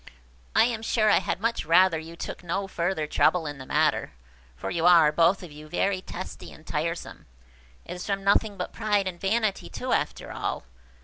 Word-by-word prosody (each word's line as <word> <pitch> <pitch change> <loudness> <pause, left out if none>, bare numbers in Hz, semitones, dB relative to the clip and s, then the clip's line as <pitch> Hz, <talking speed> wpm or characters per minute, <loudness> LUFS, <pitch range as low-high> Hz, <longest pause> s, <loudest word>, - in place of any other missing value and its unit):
I - - +7
am 230 -2 -1
sure 215 -1 +2
I - - +5
had 185 - -3
much 230 +3 -1
rather 175 0 +4
you 165 +1 -10
took 170 - -7
no 195 +3 -2
further 170 -3 -1
trouble 160 +2 +2
in 145 -2 -6
the 130 - -9
matter; - - +1 0.4
for 60 - -5
you 170 0 +1
are, 165 -4 +7
both 170 +5 +3
of 175 - -9
you, 150 +1 -12
very 185 +2 0
testy 185 0 -8
and 155 - -15
tiresome. 165 +2 -4 0.6
It - - -6
is 180 - -7
from 195 -1 -1
nothing 200 +1 +2
but 180 - -5
pride 205 -2 +1
and 175 -2 -6
vanity, 215 +1 0
too, - - -3
after - - -2
all. - - -3
180 Hz, 195 wpm, -26 LUFS, 165-200 Hz, 0.6 s, I